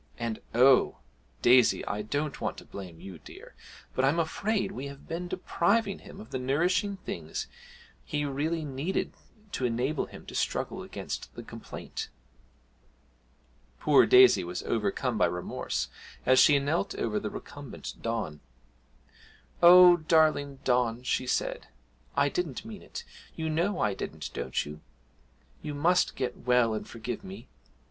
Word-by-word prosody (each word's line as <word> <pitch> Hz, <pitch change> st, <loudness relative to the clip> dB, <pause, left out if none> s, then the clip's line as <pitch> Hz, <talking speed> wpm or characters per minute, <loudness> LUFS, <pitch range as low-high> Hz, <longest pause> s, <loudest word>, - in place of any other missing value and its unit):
And, 115 Hz, -2 st, -3 dB, 0.2 s
oh! 130 Hz, +2 st, +5 dB, 0.5 s
Daisy, 125 Hz, -1 st, +5 dB
I 105 Hz, -, -2 dB
don't 145 Hz, +7 st, -3 dB
want -, -, -2 dB
to -, -, -11 dB
blame 90 Hz, -4 st, -9 dB
you, 95 Hz, -3 st, -10 dB
dear -, -, -13 dB, 0.4 s
but 130 Hz, -, 0 dB
I'm 140 Hz, +5 st, +3 dB
afraid 195 Hz, +5 st, 0 dB
we 140 Hz, -7 st, -5 dB
have 140 Hz, 0 st, -11 dB
been 175 Hz, +2 st, -4 dB
depriving 195 Hz, +3 st, 0 dB
him -, -, -12 dB
of 215 Hz, -, -11 dB
the 130 Hz, -, -2 dB
nourishing 175 Hz, +10 st, +1 dB
things -, -, -5 dB, 0.6 s
he 145 Hz, -2 st, -2 dB
really 155 Hz, +3 st, -1 dB
needed 145 Hz, +6 st, -2 dB, 0.4 s
to 130 Hz, -, -3 dB
enable 125 Hz, +5 st, 0 dB
him -, -, -12 dB
to -, -, -10 dB
struggle -, -, -2 dB
against -, -, -6 dB
the -, -, -7 dB
complaint!' -, -, -7 dB, 1.7 s
Poor 150 Hz, -2 st, +5 dB
Daisy 380 Hz, 0 st, +7 dB
was 90 Hz, +1 st, -5 dB
overcome 110 Hz, +2 st, -1 dB
by -, -, +5 dB
remorse 90 Hz, 0 st, -3 dB, 0.4 s
as 130 Hz, 0 st, +6 dB
she 150 Hz, -3 st, +7 dB
knelt 150 Hz, +7 st, -1 dB
over 105 Hz, -2 st, -1 dB
the 105 Hz, -, -4 dB
recumbent 145 Hz, +3 st, -8 dB
Don. 110 Hz, -10 st, -3 dB, 1.2 s
'Oh, 180 Hz, 0 st, +9 dB
darling 155 Hz, -3 st, +2 dB
Don,' 125 Hz, -1 st, +1 dB
she 130 Hz, 0 st, -1 dB
said, -, -, -1 dB, 0.5 s
'I 140 Hz, -, +4 dB
didn't 170 Hz, -, -3 dB
mean 220 Hz, -3 st, -8 dB
it -, -, -8 dB, 0.3 s
you 160 Hz, -1 st, -2 dB
know 175 Hz, +5 st, 0 dB
I 105 Hz, -2 st, +1 dB
didn't, -, -, -6 dB
don't 65 Hz, -, -2 dB
you? 75 Hz, +1 st, -9 dB, 0.8 s
You 150 Hz, -2 st, -5 dB
must 175 Hz, +5 st, +2 dB
get 125 Hz, -2 st, -3 dB
well 125 Hz, -2 st, +4 dB
and 110 Hz, -, -4 dB
forgive 115 Hz, -, -6 dB
me! 190 Hz, +1 st, -9 dB
140 Hz, 145 wpm, -29 LUFS, 120-170 Hz, 1.7 s, Oh